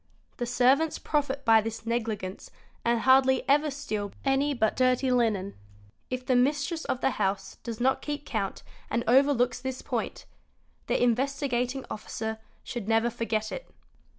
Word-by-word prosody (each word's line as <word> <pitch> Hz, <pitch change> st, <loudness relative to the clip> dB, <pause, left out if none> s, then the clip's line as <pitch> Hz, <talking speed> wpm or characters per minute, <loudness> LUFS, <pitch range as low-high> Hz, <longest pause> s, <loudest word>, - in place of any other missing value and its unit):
'The 240 Hz, -, -2 dB
servants 260 Hz, +6 st, +3 dB
profit 280 Hz, -2 st, -1 dB
by 225 Hz, -1 st, +6 dB
this 225 Hz, +1 st, -6 dB
negligence 220 Hz, -5 st, -3 dB, 0.3 s
and 235 Hz, -1 st, +2 dB
hardly 260 Hz, 0 st, +4 dB
ever 295 Hz, +2 st, +4 dB
steal 215 Hz, -8 st, -4 dB
any 275 Hz, +2 st, +2 dB
but 220 Hz, -6 st, +1 dB
dirty 255 Hz, 0 st, +2 dB
linen, 215 Hz, -6 st, +1 dB, 0.6 s
If 255 Hz, 0 st, -4 dB
the 255 Hz, -, +2 dB
mistress 285 Hz, +5 st, +1 dB
of 255 Hz, -, -2 dB
the -, -, +2 dB
house 195 Hz, -3 st, -2 dB
does 230 Hz, -2 st, -7 dB
not 265 Hz, +2 st, +2 dB
keep 295 Hz, -1 st, -4 dB
count 210 Hz, -7 st, -3 dB, 0.3 s
and 235 Hz, -, 0 dB
overlooks 250 Hz, -1 st, +3 dB
this 260 Hz, 0 st, -4 dB
point, -, -, -3 dB, 0.6 s
the -, -, +1 dB
Investigating 255 Hz, +1 st, 0 dB
Officer 220 Hz, +1 st, -4 dB, 0.2 s
should 235 Hz, -5 st, -5 dB
never 225 Hz, +1 st, +2 dB
forget 220 Hz, -2 st, -2 dB
it. -, -, -7 dB
250 Hz, 150 wpm, -28 LUFS, 225-270 Hz, 0.6 s, by